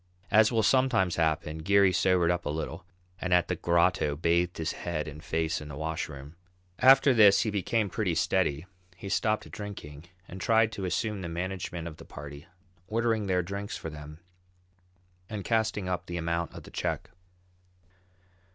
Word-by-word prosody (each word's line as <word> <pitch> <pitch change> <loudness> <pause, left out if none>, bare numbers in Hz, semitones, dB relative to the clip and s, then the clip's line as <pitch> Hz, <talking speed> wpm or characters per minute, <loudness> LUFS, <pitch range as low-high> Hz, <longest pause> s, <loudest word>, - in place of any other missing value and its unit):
As 110 +1 +5
will 115 -2 +2
sometimes 115 -7 +2
happen, 80 -1 0
Geary 100 +3 +4
sobered 90 -1 +3
up 85 -2 -2
a - - -1
little 80 +2 -5 0.3
and 90 - -3
at 90 - +2
the - - 0
"Grotto" 85 -3 +2
bathed 85 +3 +1
his 80 -1 -2
head 80 -3 -4
and 75 +1 -9
face 80 -2 -1
in 75 - -8
the 75 - -8
washroom. 75 -1 -5 0.4
After 135 +1 +7
this 105 -4 +6
he 110 - -1
became 105 +2 0
pretty 95 -4 -1
steady, 85 -2 +1 0.3
he 95 +2 -8
stopped 110 +2 0
drinking, 85 -8 -8 0.2
and 95 +1 -9
tried 110 +1 +3
to 100 -3 -5
assume 105 +2 -2
the 85 - -5
management 90 -1 -4
of 80 -2 -9
the - - -12
party, 70 0 -10 0.4
ordering 115 -1 0
their 90 -1 +1
drinks 100 +3 -5
for 80 - -6
them, 75 0 -10 1.1
and 105 -3 -5
casting 110 -4 0
up 90 -2 -3
the 85 - -4
amount 85 0 -2
of - - -9
the - - -13
check. - - -3
90 Hz, 170 wpm, -28 LUFS, 80-105 Hz, 1.1 s, After